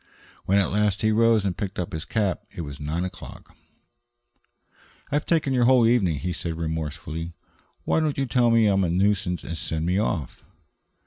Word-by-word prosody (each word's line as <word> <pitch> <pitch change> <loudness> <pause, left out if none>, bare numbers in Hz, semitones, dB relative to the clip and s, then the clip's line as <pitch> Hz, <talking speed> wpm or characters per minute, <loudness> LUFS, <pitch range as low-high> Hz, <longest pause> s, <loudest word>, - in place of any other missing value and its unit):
When, 100 - +3
at 100 -3 +2
last, 105 0 +1
he 110 - +3
rose 115 -1 +3
and 95 -3 -1
picked 100 0 -5
up 90 - -4
his 80 +1 -4
cap; 100 -6 -1
it - - -7
was 70 -3 -7
nine 75 +4 -2
o'clock. 90 -1 -10 1.6
"I've 145 +1 0
taken 155 -5 +2
your 125 -2 +3
whole 125 -2 +5
evening," 105 -10 +2
he 90 +5 -3
said 85 -1 -4
remorsefully. 80 0 -4 0.5
"Why - - +1
don't 155 -2 0
you 135 - +1
tell 125 -2 +2
me 115 -2 +4
I 100 - +3
am 95 0 +2
a 90 - 0
nuisance 95 0 +1
and 85 - -5
send 80 0 -3
me 90 +3 +1
off?" 90 - -2
95 Hz, 190 wpm, -25 LUFS, 85-115 Hz, 1.6 s, whole